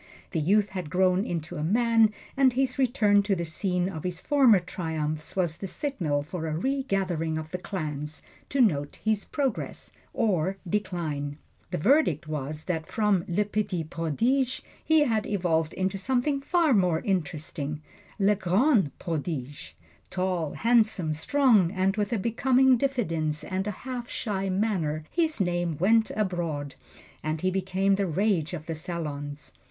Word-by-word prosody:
The 165 - 0
youth 200 +6 +3
had 180 -5 -5
grown 185 +2 +3
into 170 0 -4
a 150 - -2
man, 225 +4 +4 0.2
and 270 -2 +4
his 260 0 0
return 220 -6 +4
to 200 -1 0
the 170 -1 -3
scene 180 +2 -1
of 160 -5 -6
his 180 -1 -3
former 265 -6 +5
triumphs 155 -3 -4
was 175 -4 0
the 195 - -5
signal 175 - -2
for 160 +1 -5
a 155 0 -2
regathering 190 - -1
of 160 0 -5
the 180 - -3
clans 150 -5 -5 0.3
to 275 - +2
note 145 - +1
his 215 -2 +1
progress 270 -6 -3 0.2
or 190 -3 0
decline. 165 -7 -2 0.3
The - - -2
verdict 175 - +3
was 150 0 -4
that 165 -3 -3
from 210 -5 +1
"Le 195 +4 +1
Petit 205 -4 -1
Prodige," 230 - 0 0.2
he 315 -1 +4
had 225 -7 +1
evolved 170 -5 0
into 190 +1 -1
something 265 +6 0
far 330 -1 +3
more 180 -6 +2
interesting 155 -4 -3 0.3
"Le 205 0 +4
Grand 195 - +2
Prodige." 150 -5 -4 0.4
Tall, 180 -5 -1
handsome, 215 -8 +2
strong, 210 - +3
and 190 0 +1
with 210 +1 -1
a 235 - +1
becoming 255 +5 +3
diffidence 165 - -1
and 190 +2 -3
a 210 +3 -6
half 250 -2 -4
shy 195 -3 -2
manner, 185 -6 0
his 320 -5 0
name 175 -4 0
went 220 +6 +3
abroad, 170 -8 -2 0.5
and 155 0 -2
he 185 - +1
became 190 +1 +1
the 195 0 +1
rage 180 -1 0
of 155 -2 -8
the 165 - -3
salons. 150 -3 -5
185 Hz, 155 wpm, -27 LUFS, 160-220 Hz, 0.5 s, former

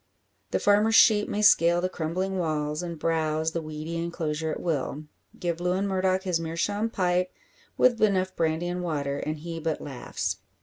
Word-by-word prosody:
The - - +1
farmer's 210 +2 +3
sheep 210 -2 +6
may 210 - -1
scale 170 -3 +5
the 180 - 0
crumbling 185 +2 -2
walls, 150 -2 -1
and 170 -2 -5
browse 160 0 0
the 165 - -2
weedy 155 +2 -5
enclosure 160 -2 -2
at - - -3
will; 150 -2 -2 0.4
give 170 -1 -2
Lewin 185 +3 0
Murdock 190 -1 +1
his 180 -4 0
meerschaum 205 +7 -1
pipe, 180 -3 0 0.5
with 245 -2 +4
enough 190 -3 +2
brandy 160 +1 0
and 180 0 -3
water, 145 -5 -2
and 155 +1 -3
he 165 +2 -6
but 160 -1 -2
laughs. 135 -4 -4
170 Hz, 170 wpm, -27 LUFS, 155-185 Hz, 0.5 s, sheep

